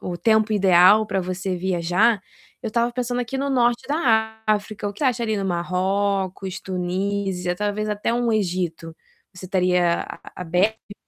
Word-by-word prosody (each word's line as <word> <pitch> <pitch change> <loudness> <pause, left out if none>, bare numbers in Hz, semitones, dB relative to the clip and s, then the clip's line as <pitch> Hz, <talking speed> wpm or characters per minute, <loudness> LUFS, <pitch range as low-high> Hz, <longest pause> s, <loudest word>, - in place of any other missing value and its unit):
o 175 - -4
tempo 220 +4 +2
ideal 195 +1 +5
pra 195 -2 -1
você 185 +1 -3
viajar, 185 +4 +1 0.4
eu 225 - -2
estava 235 +2 +1
pensando 245 0 -2
aqui 245 +2 -4
no 275 +1 -1
norte 240 -2 +1
da 220 -7 +1
África. 210 -1 -1
O - - -6
que 205 - -4
acha 250 -3 +1
ali 220 -2 0
do 200 - -2
Marrocos, 190 +1 -1
Tunísia, 185 0 -2
talvez 210 +2 -2
até 210 +2 -1
um 240 -1 +1
Egito? 175 -5 -2 0.4
Você 185 0 -11
estaria 180 -2 +2
a - - -9
a - - -11
aberta? 200 +5 -1
200 Hz, 165 wpm, -22 LUFS, 180-220 Hz, 0.4 s, ideal